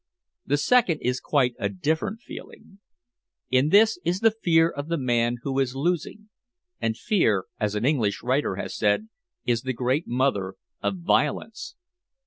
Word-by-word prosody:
The 145 Hz, -, +2 dB
second 190 Hz, 0 st, +3 dB
is 125 Hz, 0 st, 0 dB
quite 130 Hz, -4 st, +1 dB
a -, -, 0 dB
different 180 Hz, +5 st, -2 dB
feeling. 200 Hz, -4 st, -12 dB, 0.7 s
In 130 Hz, +3 st, +3 dB
this 215 Hz, +1 st, +5 dB
is 175 Hz, +3 st, -1 dB
the 225 Hz, -1 st, +5 dB
fear 165 Hz, -7 st, +3 dB
of 145 Hz, -3 st, -6 dB
the 170 Hz, 0 st, -1 dB
man 120 Hz, -3 st, +1 dB
who 135 Hz, -1 st, -1 dB
is 135 Hz, -1 st, 0 dB
losing 175 Hz, +8 st, -2 dB, 0.5 s
and 110 Hz, 0 st, -1 dB
fear, 110 Hz, -, +1 dB
as 105 Hz, -2 st, -1 dB
an 105 Hz, +3 st, -1 dB
English 115 Hz, -10 st, +1 dB
writer 130 Hz, -4 st, 0 dB
has -, -, -5 dB
said, 110 Hz, -, +1 dB, 0.4 s
is 120 Hz, -2 st, +1 dB
the 130 Hz, 0 st, -3 dB
great 130 Hz, +6 st, -1 dB
mother 120 Hz, -7 st, 0 dB, 0.3 s
of 190 Hz, -, -1 dB
violence. 220 Hz, -, -1 dB
140 Hz, 155 wpm, -25 LUFS, 120-180 Hz, 0.7 s, this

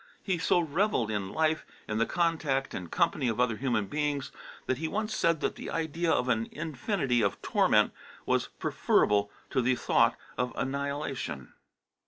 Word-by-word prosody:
He 185 Hz, -3 st, 0 dB
so 180 Hz, -, +3 dB
revelled 165 Hz, -, +1 dB
in 100 Hz, -3 st, -2 dB
life, 155 Hz, +2 st, +1 dB, 0.2 s
in 110 Hz, 0 st, -1 dB
the 115 Hz, -, +2 dB
contact 160 Hz, -6 st, 0 dB
and 90 Hz, -2 st, -5 dB
company 135 Hz, -, +1 dB
of 115 Hz, 0 st, -1 dB
other 120 Hz, -3 st, +2 dB
human 120 Hz, -5 st, 0 dB
beings, 145 Hz, +2 st, -2 dB, 0.3 s
that 130 Hz, 0 st, -1 dB
he 160 Hz, -, -1 dB
once 215 Hz, +4 st, -2 dB
said 165 Hz, -5 st, +2 dB
that -, -, 0 dB
the -, -, -6 dB
idea 165 Hz, +1 st, -1 dB
of 125 Hz, -, +2 dB
an 115 Hz, -2 st, +1 dB
infinity 145 Hz, -, -1 dB
of -, -, 0 dB
torment -, -, +3 dB, 0.3 s
was -, -, +1 dB
preferable 105 Hz, 0 st, +2 dB, 0.2 s
to 130 Hz, -, +2 dB
the 125 Hz, +1 st, +2 dB
thought -, -, +3 dB, 0.2 s
of 125 Hz, 0 st, 0 dB
annihilation. 140 Hz, -, -3 dB
140 Hz, 165 wpm, -29 LUFS, 120-160 Hz, 0.3 s, so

